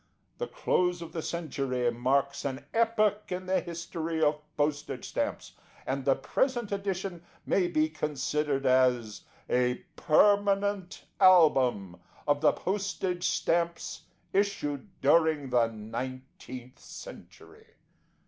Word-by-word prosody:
The 485 Hz, -, -2 dB
close 180 Hz, -, 0 dB
of 165 Hz, -, -10 dB
the 165 Hz, -, -3 dB
century 135 Hz, -8 st, -1 dB
marks 135 Hz, +4 st, 0 dB
an 135 Hz, -1 st, -4 dB
epoch 215 Hz, -3 st, +1 dB
in 180 Hz, +1 st, -3 dB
the 185 Hz, 0 st, +2 dB
history 165 Hz, -1 st, -4 dB
of 150 Hz, -1 st, +2 dB, 0.2 s
postage 145 Hz, 0 st, -2 dB
stamps, -, -, -3 dB, 0.3 s
and 135 Hz, 0 st, -2 dB
the 135 Hz, 0 st, +3 dB
present 240 Hz, -, -1 dB
edition 195 Hz, -3 st, -3 dB, 0.2 s
may 185 Hz, -2 st, +2 dB
be 155 Hz, -3 st, +2 dB
considered 150 Hz, -2 st, -1 dB
as 125 Hz, -4 st, +2 dB, 0.3 s
A 125 Hz, 0 st, +2 dB, 0.2 s
PERMANENT 200 Hz, +2 st, +2 dB
ALBUM 130 Hz, -, +5 dB, 0.3 s
Of 145 Hz, 0 st, +2 dB
the 155 Hz, -, +6 dB
Postage 190 Hz, -2 st, -2 dB
Stamps 170 Hz, 0 st, -1 dB, 0.3 s
issued 195 Hz, -9 st, -1 dB
during 150 Hz, -2 st, +3 dB
THE 120 Hz, -2 st, +4 dB
NINETEENTH 125 Hz, +3 st, -7 dB
CENTURY. 455 Hz, -2 st, -12 dB
155 Hz, 110 wpm, -29 LUFS, 130-185 Hz, 0.3 s, the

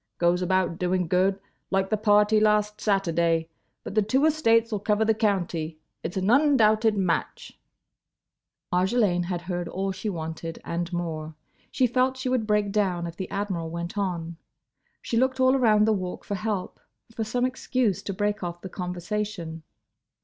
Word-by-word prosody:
Goes 175 Hz, +1 st, +2 dB
about 180 Hz, -1 st, 0 dB
doing 180 Hz, -1 st, 0 dB
good—like 190 Hz, +1 st, -1 dB
the -, -, +4 dB
party 210 Hz, 0 st, +4 dB
last 210 Hz, 0 st, +2 dB
Saturday. 170 Hz, -5 st, +1 dB, 0.3 s
But -, -, -6 dB
the 215 Hz, -, +3 dB
two 255 Hz, +8 st, +2 dB
estates 230 Hz, -7 st, +3 dB
'll 210 Hz, -, -1 dB
cover 210 Hz, +2 st, +1 dB
the 220 Hz, -, +4 dB
county. 175 Hz, -7 st, -1 dB, 0.2 s
It's 175 Hz, -, -5 dB
an 190 Hz, +3 st, +1 dB
undoubted 225 Hz, -6 st, +4 dB
match—" 195 Hz, -, -2 dB, 1.2 s
Marjolaine 185 Hz, -1 st, +2 dB
had 175 Hz, -1 st, -3 dB
heard 175 Hz, -1 st, -3 dB
all 195 Hz, +3 st, -2 dB
she 190 Hz, +3 st, -4 dB
wanted—and 165 Hz, 0 st, -5 dB
more. 160 Hz, -3 st, -4 dB, 0.3 s
She 260 Hz, -, +2 dB
felt 255 Hz, +2 st, +1 dB
she 260 Hz, 0 st, -2 dB
would 250 Hz, -4 st, 0 dB
break 210 Hz, -1 st, +1 dB
down 190 Hz, -5 st, 0 dB
if 170 Hz, -1 st, -6 dB
the 190 Hz, 0 st, -5 dB
Admiral 195 Hz, -5 st, -3 dB
went 170 Hz, +2 st, -5 dB
on. 170 Hz, -5 st, -3 dB, 0.7 s
She 230 Hz, -, -1 dB
looked 260 Hz, +2 st, +1 dB
all 260 Hz, +1 st, +5 dB
around 215 Hz, -5 st, +4 dB
the 220 Hz, -, +3 dB
Walk 185 Hz, -3 st, -4 dB
for -, -, -5 dB
help; 205 Hz, -1 st, -3 dB, 0.3 s
for 225 Hz, -, -2 dB
some 245 Hz, +3 st, 0 dB
excuse 255 Hz, -5 st, 0 dB
to -, -, -4 dB
break 205 Hz, +1 st, -1 dB
off 175 Hz, 0 st, -5 dB
the 190 Hz, -, -7 dB
conversation. 180 Hz, -1 st, -4 dB
195 Hz, 160 wpm, -26 LUFS, 175-220 Hz, 1.2 s, all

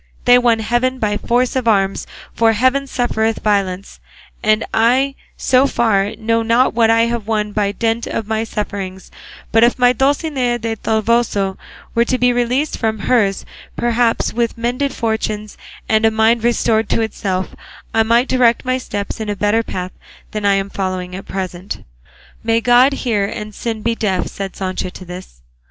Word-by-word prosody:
They 245 Hz, 0 st, +7 dB
won 240 Hz, -2 st, +3 dB
heaven 240 Hz, +4 st, 0 dB
by 210 Hz, -4 st, 0 dB
force 245 Hz, +4 st, 0 dB
of 255 Hz, -3 st, -1 dB
arms, 195 Hz, -3 st, +1 dB, 0.3 s
for 225 Hz, -1 st, +3 dB
heaven 260 Hz, +5 st, +1 dB
suffereth 225 Hz, -3 st, -1 dB
violence; 195 Hz, -2 st, -1 dB, 0.4 s
and 215 Hz, +1 st, +2 dB
I, 255 Hz, +5 st, +3 dB, 0.2 s
so 260 Hz, +2 st, +3 dB
far, 215 Hz, -4 st, +1 dB
know 230 Hz, +1 st, 0 dB
not 230 Hz, +3 st, +2 dB
what 225 Hz, -1 st, +3 dB
I 225 Hz, 0 st, +4 dB
have 235 Hz, -2 st, -1 dB
won 210 Hz, -2 st, -1 dB
by 205 Hz, -1 st, 0 dB
dint 225 Hz, +2 st, -1 dB
of 225 Hz, -, -3 dB
my 220 Hz, +1 st, -1 dB
sufferings; 200 Hz, -4 st, -5 dB, 0.4 s
but 225 Hz, +1 st, +4 dB
if 240 Hz, +2 st, +3 dB
my 245 Hz, 0 st, +4 dB
Dulcinea 270 Hz, -3 st, 0 dB
del 225 Hz, -1 st, -3 dB
Toboso 220 Hz, -3 st, 0 dB, 0.4 s
were 235 Hz, 0 st, +3 dB
to 255 Hz, -, 0 dB
be 250 Hz, 0 st, +3 dB
released 245 Hz, +5 st, 0 dB
from 220 Hz, -1 st, 0 dB
hers, 200 Hz, -2 st, +1 dB, 0.3 s
perhaps 235 Hz, -1 st, +1 dB
with 235 Hz, -1 st, -1 dB
mended 250 Hz, +4 st, -1 dB
fortunes 215 Hz, -2 st, -3 dB, 0.3 s
and 220 Hz, 0 st, +2 dB
a 225 Hz, -, +6 dB
mind 220 Hz, +1 st, +2 dB
restored 225 Hz, -2 st, +1 dB
to -, -, +1 dB
itself 195 Hz, -4 st, -2 dB, 0.4 s
I 225 Hz, -, +3 dB
might 235 Hz, +3 st, +3 dB
direct 250 Hz, -1 st, +2 dB
my 255 Hz, 0 st, 0 dB
steps 205 Hz, -4 st, -5 dB
in 215 Hz, -1 st, -4 dB
a 205 Hz, -, -1 dB
better 210 Hz, +3 st, +1 dB
path 185 Hz, -4 st, -5 dB, 0.4 s
than 210 Hz, -1 st, -3 dB
I 200 Hz, -, +4 dB
am 195 Hz, 0 st, -2 dB
following 185 Hz, -2 st, -3 dB
at 190 Hz, -, -8 dB
present." 185 Hz, 0 st, -5 dB, 0.6 s
"May 225 Hz, 0 st, +2 dB
God 245 Hz, +4 st, +5 dB
hear 225 Hz, -7 st, 0 dB
and 210 Hz, +1 st, -6 dB
sin 225 Hz, 0 st, -4 dB
be 230 Hz, -, +1 dB
deaf," 200 Hz, -5 st, -1 dB
said 195 Hz, -1 st, -6 dB
Sancho 185 Hz, -1 st, -3 dB
to 185 Hz, -, -11 dB
this. 180 Hz, -, -10 dB
225 Hz, 175 wpm, -18 LUFS, 205-240 Hz, 0.6 s, They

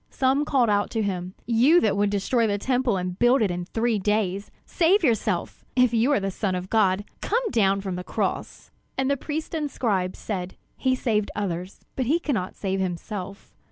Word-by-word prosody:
Some 270 Hz, +2 st, +1 dB
called 250 Hz, -7 st, +2 dB
out 205 Hz, 0 st, +1 dB
to 220 Hz, -, +1 dB
him: 185 Hz, -2 st, -3 dB
"You 245 Hz, +9 st, +5 dB
that 210 Hz, -3 st, +2 dB
would 205 Hz, 0 st, +2 dB
destroy 220 Hz, +4 st, +1 dB
the 205 Hz, -1 st, 0 dB
Temple 250 Hz, -1 st, +1 dB
and 180 Hz, 0 st, -4 dB
build 240 Hz, 0 st, +4 dB
it 200 Hz, -, +1 dB
in 175 Hz, 0 st, -3 dB
three 225 Hz, +3 st, 0 dB
days, 200 Hz, -1 st, 0 dB, 0.2 s
save 365 Hz, +3 st, +3 dB
yourself. 235 Hz, -7 st, 0 dB
If 250 Hz, -2 st, +4 dB
you 235 Hz, +5 st, +3 dB
are 285 Hz, -, +3 dB
the 195 Hz, 0 st, -2 dB
Son 190 Hz, -1 st, -1 dB
of 180 Hz, +1 st, -5 dB
God, 205 Hz, -2 st, +2 dB, 0.2 s
come 460 Hz, 0 st, 0 dB
down 195 Hz, -3 st, +2 dB
from 190 Hz, -2 st, -4 dB
the 180 Hz, -, -5 dB
cross!" -, -, -3 dB, 0.3 s
And 265 Hz, +1 st, +1 dB
the -, -, +3 dB
priests 310 Hz, +4 st, -5 dB
and 305 Hz, -3 st, -1 dB
scribes 195 Hz, -8 st, -1 dB
said: 185 Hz, -3 st, -4 dB, 0.2 s
"He 260 Hz, -1 st, +1 dB
saved 215 Hz, -5 st, 0 dB
others, 185 Hz, -2 st, -4 dB
but 255 Hz, -3 st, -1 dB
he 310 Hz, +6 st, +3 dB
cannot 255 Hz, -, -2 dB
save 195 Hz, -1 st, -2 dB
himself. 190 Hz, +2 st, -5 dB
210 Hz, 195 wpm, -25 LUFS, 190-260 Hz, 0.3 s, You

